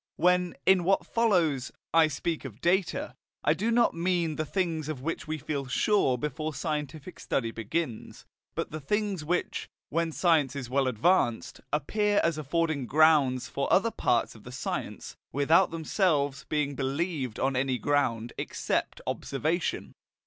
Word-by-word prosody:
When, 180 +1 +2
in 190 -2 +5
what 195 +3 +2
follows, 175 - +1 0.2
I 165 -1 +6
speak 160 +2 -3
of 120 -5 -9
data, 190 - 0 0.3
I - - +4
do 225 - -1
not 235 0 +3
mean 170 -2 0
the 155 0 -3
things 165 -5 -1
of 135 -4 -5
which 165 +1 -3
we 155 0 -2
feel 140 -1 -4
sure 130 -1 +2
before 150 +3 -3
scientific 150 +3 -4
study 115 -3 -1
begins, 115 +2 -4 0.3
but - - -3
the 155 - -4
things 200 +3 -1
which, 175 +4 -2 0.2
when 165 +1 0
a - - -9
science 155 -7 +2
is 130 -3 -5
well 135 0 +2
advanced, 125 - +1
appear 205 +8 +1
as 165 -2 +1
affording 155 -2 -1
grounds 145 -4 +4
for - - -2
other - - +4
parts - - +1
of - - -15
the - - -9
science, - - -5
without 160 +7 +4
themselves 155 -4 0
being 150 -2 0
believed 140 -2 -2
on 135 0 +1
any 130 0 +1
ground 120 -5 0
except - - -2
observation. 155 +5 -2
155 Hz, 155 wpm, -28 LUFS, 135-175 Hz, 0.3 s, I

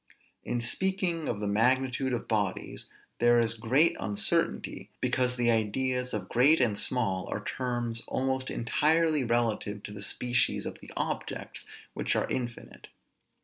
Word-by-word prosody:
In 120 - -2
speaking 175 +4 0
of 105 -3 -2
the 105 - -1
magnitude 130 +5 +2
of 120 - -3
bodies 105 -4 -2 0.3
there 120 0 +5
is 115 -1 +3
great 125 +8 +3
uncertainty, 100 +1 0
because 125 -1 +1
the 120 -1 +2
ideas 125 +3 0
of 100 -3 -4
great 140 - +4
and 120 -5 +2
small 100 -5 0
are - - -3
terms 120 -2 -2
almost 130 0 -1
entirely 155 +5 +2
relative 115 -3 -1
to - - -7
the 100 -1 -8
species 120 +5 +1
of - - -6
the - - -13
objects, - - -4 0.3
which - - -1
are - - +1
infinite. 120 -2 -5
120 Hz, 145 wpm, -29 LUFS, 110-130 Hz, 0.3 s, there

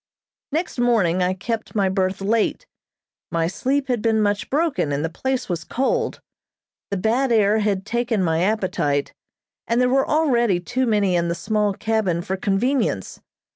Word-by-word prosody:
Next 320 -3 -2
morning 205 -8 +2
I 180 +1 +1
kept 225 +5 -4
my 200 -2 +2
berth 190 0 -1
late. 225 - 0 0.7
My 165 -1 +1
sleep 270 +10 -1
had 245 -4 0
been 225 -1 +2
much 205 -1 0
broken, 290 - 0
and 145 +2 -1
the 165 - -4
place 260 +7 -2
was 170 -3 -3
cold. 450 - -1 0.7
The 200 - -2
bad 235 +7 +1
air 215 -1 +4
had 200 -2 0
taken 235 -2 0
my 165 -1 +1
appetite, 180 -8 0 0.5
and 230 +1 +1
there 250 0 +3
were 270 +1 +2
already 240 - +2
too 245 +7 -1
many 205 -4 +2
in 170 0 +1
the 170 - -1
small 210 +2 0
cabin 210 -5 0
for 190 - -2
convenience. 200 - -1
210 Hz, 165 wpm, -22 LUFS, 185-245 Hz, 0.7 s, air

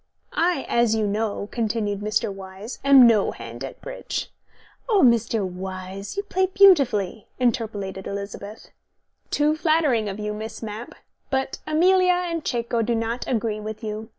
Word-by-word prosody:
"I, 340 -4 +1
as 235 -2 +2
you 220 -1 +1
know," 205 0 -2
continued 215 -3 -1
Mr. 210 0 -1
Wyse, 195 +4 -9
"am 275 -2 +8
no 220 -4 +4
hand 115 +2 -8
at 135 - -7
bridge." - - -5 0.6
"Oh, 415 -4 +4
Mr. 230 -4 +2
Wyse, 185 - -7
you 400 - 0
play 375 -2 0
beautifully," 275 - +4
interpolated 210 -6 -1
Elizabeth. 200 +1 -7 0.6
"Too 300 +1 +2
flattering 310 - +2
of 195 - -5
you, 210 0 -3
Miss 220 +2 -7
Mapp. 220 +2 -7 0.3
But 265 -1 -1
Amelia 365 +4 +4
and 340 -3 -2
Cecco 235 -1 -1
do 230 +1 0
not 230 +2 -2
agree 225 -3 -1
with 215 +2 -7
you. 215 +1 -5
225 Hz, 150 wpm, -24 LUFS, 205-275 Hz, 0.6 s, am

